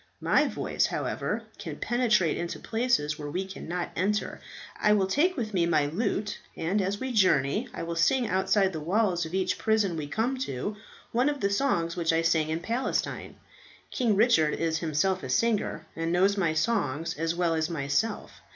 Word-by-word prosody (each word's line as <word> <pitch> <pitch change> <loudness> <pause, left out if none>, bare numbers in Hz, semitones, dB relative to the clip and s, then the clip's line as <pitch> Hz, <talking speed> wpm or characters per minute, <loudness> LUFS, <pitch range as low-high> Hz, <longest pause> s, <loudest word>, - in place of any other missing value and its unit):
My - - +3
voice, - - 0
however, - - -2 0.2
can - - -6
penetrate 215 -9 +2
into 170 0 -4
places 220 -11 0
where 145 -1 -5
we 185 +6 -2
cannot 180 -2 -5
enter. 205 +4 -1 0.4
I 210 - +5
will 200 -2 +3
take 305 - +1
with 220 -4 -3
me 170 -3 +2
my 155 -4 +3
lute, 205 +6 -2 0.2
and 190 +6 0
as 195 +2 -1
we 260 0 -3
journey 200 - +2
I - - -6
will 170 0 -4
sing 235 +9 +2
outside 190 +1 +2
the 160 - -3
walls 175 0 +1
of 165 - -6
each 190 -1 0
prison 215 -5 +1
we 155 -2 -4
come 235 - -1
to 205 - -3 0.4
one 250 +5 +2
of 290 -1 -3
the 200 -3 0
songs 170 -8 +1
which 170 -2 +1
I 165 0 +1
sang 160 -2 +2
in 160 +1 -2
Palestine. 235 +8 -2 0.6
King 235 -5 +1
Richard 200 -8 +4
is 165 0 -1
himself 170 +4 0
a 130 - -6
singer 205 - 0
and 165 0 -2
knows 190 +3 +3
my 170 -6 0
songs 160 - 0
as 165 +1 0
well 170 -1 +1
as 160 0 0
myself. 155 +7 -2
185 Hz, 185 wpm, -28 LUFS, 165-220 Hz, 0.6 s, I